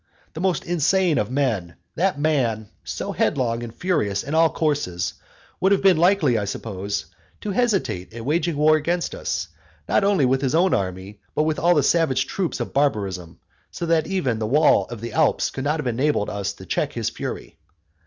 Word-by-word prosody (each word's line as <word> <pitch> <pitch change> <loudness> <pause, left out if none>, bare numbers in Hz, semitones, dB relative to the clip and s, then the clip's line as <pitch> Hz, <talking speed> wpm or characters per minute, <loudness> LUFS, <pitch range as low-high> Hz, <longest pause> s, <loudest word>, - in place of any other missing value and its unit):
That - - -7
most 185 -2 0
insane 175 0 +2
of 105 - -1
men, 115 -11 -1 0.2
that 185 -4 0
man 120 -9 0
so - - -4
headlong 120 -3 0
and 120 -1 -6
furious 115 - -1
in 140 +5 -5
all 160 0 +5
his - - -12
courses, 100 - -1 0.5
would 190 - +3
have 200 - +3
been 190 -4 +6
likely, 165 - +3
I 100 - -2
suppose, 100 -2 -4 0.4
to 210 - -3
hesitate 195 - 0
at 115 0 -8
waging 165 +2 0
war 155 +1 +5
against 170 +3 -1
us, - - -3 0.4
not - - +2
only 195 -8 +3
with 130 +1 +2
his 135 +1 0
own 185 +3 +3
army, 95 +2 -3 0.2
but 150 - +2
with 155 0 0
all 175 +2 +4
the - - +3
savage 135 -7 +2
troops 185 +2 -3
of - - -4
barbarism, 100 - -1 0.3
so 170 - -5
that 165 -2 +2
even 140 -12 -1
the 110 - -1
wall 150 +6 +4
of 120 -3 -9
the 120 - -6
Alps 160 -3 +1
would 130 - -3
not 150 +2 0
have 150 - -3
enabled 125 -2 0
us 100 -1 -3
to 95 - -12
check - - -1
his - - -2
frenzy. - - -6
145 Hz, 195 wpm, -23 LUFS, 110-170 Hz, 0.5 s, been